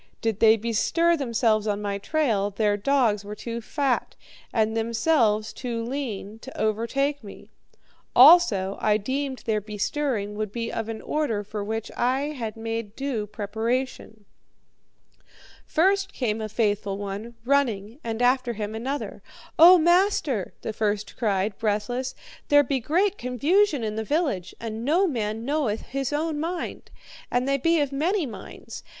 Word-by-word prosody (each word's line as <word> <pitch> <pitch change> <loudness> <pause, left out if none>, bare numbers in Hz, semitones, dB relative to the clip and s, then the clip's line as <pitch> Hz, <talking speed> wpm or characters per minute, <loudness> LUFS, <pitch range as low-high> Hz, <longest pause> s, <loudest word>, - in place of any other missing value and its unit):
Did 225 -2 -1
they 225 0 +6
bestir 235 +10 +2
themselves 230 -6 +1
on 205 -1 0
my 200 -1 -3
trail, 220 -6 0
their 205 0 +1
dogs 215 -2 +1
were 205 +1 -7
too 235 +2 -5
fat, 270 +2 -1 0.4
and 220 -1 +1
themselves 225 -1 +1
too 235 -3 -4
lean, 225 -5 -5
to 265 +3 -10
overtake 235 +6 0
me; 200 - -12 0.6
also, 245 - +6
I 210 -1 +3
deemed 265 +5 -3
their 215 -2 0
bestirring 210 +1 -2
would 210 -1 -3
be 230 +1 -3
of 225 0 -3
an 225 -1 -6
order 240 -9 -1
for 210 0 -5
which 220 +1 -4
I 265 +4 0
had 225 -5 -5
made 225 -1 -4
due 260 -6 -3
preparation. 220 +1 -3 1.4
"First 390 +4 +2
came 225 -4 -1
a 215 - -4
faithful 205 -2 0
one, 205 +4 -6
running, 240 -4 0
and 230 +1 -2
after 250 -1 +2
him 210 -1 -4
another. 260 +6 -4 0.4
'O 355 +3 +10
master,' 345 - +2
the 220 - -3
first 210 -1 -2
cried, 205 -4 -1
breathless, 225 +4 -1 0.3
'there 290 0 +6
be 270 0 -1
great 370 - +1
confusion 285 - +2
in 215 0 -3
the 220 - -1
village, 265 - -1
and 225 0 -5
no 330 +9 +3
man 225 - -2
knoweth 275 -7 0
his 270 0 -3
own 305 +1 -1
mind, 340 +3 -4 0.4
and 245 +2 0
they 275 0 +2
be 330 +4 +3
of 285 -2 0
many 335 +6 0
minds. 225 0 -9
230 Hz, 150 wpm, -25 LUFS, 215-280 Hz, 1.4 s, O